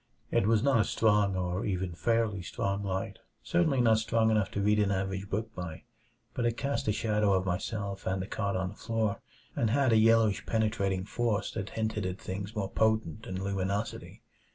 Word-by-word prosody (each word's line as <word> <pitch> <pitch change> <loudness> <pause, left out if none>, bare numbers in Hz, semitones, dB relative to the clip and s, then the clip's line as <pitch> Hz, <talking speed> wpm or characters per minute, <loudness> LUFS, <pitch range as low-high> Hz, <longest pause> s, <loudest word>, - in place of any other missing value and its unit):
It 100 - +2
was 110 0 +3
not 135 -4 +4
a - - +5
strong 105 -4 +2
or 90 0 -1
even 95 -2 -1
a - - -9
fairly 115 -1 +1
strong 100 +2 -2
light; 95 -1 -3 0.2
certainly 160 -6 +2
not 120 - +4
nearly 110 - +4
strong 110 0 +2
enough 105 -3 +2
to 100 - -1
read 105 +1 +3
an 105 -1 +2
average 95 0 -2
book 110 +2 -3
by. 85 -5 -6 0.5
But 120 - 0
it 115 0 -1
cast 140 -4 -2
a - - +4
shadow 105 -2 +1
of 95 0 +1
myself 100 +2 -3
and 95 0 0
the 95 - -3
cot 100 -1 -2
on 95 0 -1
the 100 - -11
floor, 110 -2 -1 0.3
and 115 - +1
had 130 0 +3
a - - +6
yellowish, 110 -1 +4
penetrating 100 -4 0
force 115 -1 -1
that 95 - -4
hinted 110 -3 -1
at 90 0 -4
things 100 +3 -5
more 100 -2 -2
potent 110 -4 +1
than 95 0 -4
luminosity. 100 +2 -3
105 Hz, 200 wpm, -30 LUFS, 95-110 Hz, 0.5 s, a